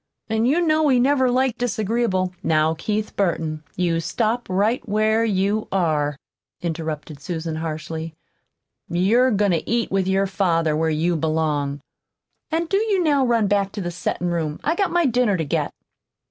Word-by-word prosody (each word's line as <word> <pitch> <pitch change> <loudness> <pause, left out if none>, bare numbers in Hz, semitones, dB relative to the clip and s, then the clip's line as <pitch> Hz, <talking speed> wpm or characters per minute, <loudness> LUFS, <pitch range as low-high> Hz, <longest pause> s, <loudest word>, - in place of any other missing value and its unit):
An' 220 +1 +1
you 310 +7 +3
know 310 -2 +3
he 255 -3 +4
never 260 0 +3
liked 255 -1 +1
disagreeable 220 -5 0
" - - -38
"Now, 155 0 +2
Keith 210 +6 -3
Burton, 160 -5 -1
you 170 -2 +1
stop 225 +7 -1
right 205 +6 +1
where 215 +2 +2
you 205 0 0
are," 150 -6 0 0.4
interrupted 160 -3 -4
Susan 160 +1 -4
harshly. 160 0 -5 0.7
"You're 215 +9 +3
goin' 205 -3 +2
to 165 - -1
eat 235 -1 0
with 190 -1 +1
your 195 +1 +2
father 170 -5 +1
where 160 +1 +1
you 165 +3 +1
belong. 150 -3 -1 0.7
An' 330 +1 0
do 390 +4 +1
you 405 -4 +1
now 290 -4 +3
run 235 -3 +2
back 200 -1 +1
to 210 - -4
the 175 -1 -3
settin' 175 +1 -2
room. 160 -3 -2
I've 325 +5 0
got 395 - +2
my 345 -1 +2
dinner 245 -6 +2
to 160 - -2
get." 140 - -1
195 Hz, 170 wpm, -22 LUFS, 160-240 Hz, 0.7 s, he